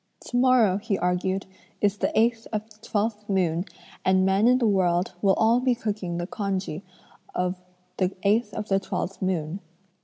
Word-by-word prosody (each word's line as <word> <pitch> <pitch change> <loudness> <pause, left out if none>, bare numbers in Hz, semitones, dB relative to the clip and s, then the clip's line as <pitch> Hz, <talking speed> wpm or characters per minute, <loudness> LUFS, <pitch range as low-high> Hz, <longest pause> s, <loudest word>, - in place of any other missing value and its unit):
'Tomorrow,' 245 -6 +4
he 210 -2 -1
argued, 185 +2 0 0.3
'is 205 0 +1
the - - 0
eighth 230 0 +1
of 215 0 -3
the 210 - -17
twelfth 210 -1 -2
moon, 175 -3 +1 0.4
and 190 0 +3
men 195 +4 +3
in 250 +1 +5
the 250 - +1
world 185 -3 +2
will 195 -2 +4
all 225 +2 +4
be 250 -1 +2
cooking 205 -6 -3
the 175 - -2
congee 195 -4 -3 0.5
of 180 0 0 0.4
the 185 -1 +1
eighth 210 +2 +2
of 215 -1 -4
the 195 0 +2
twelfth 195 0 -4
moon. 180 -2 -1
200 Hz, 165 wpm, -25 LUFS, 185-220 Hz, 0.5 s, in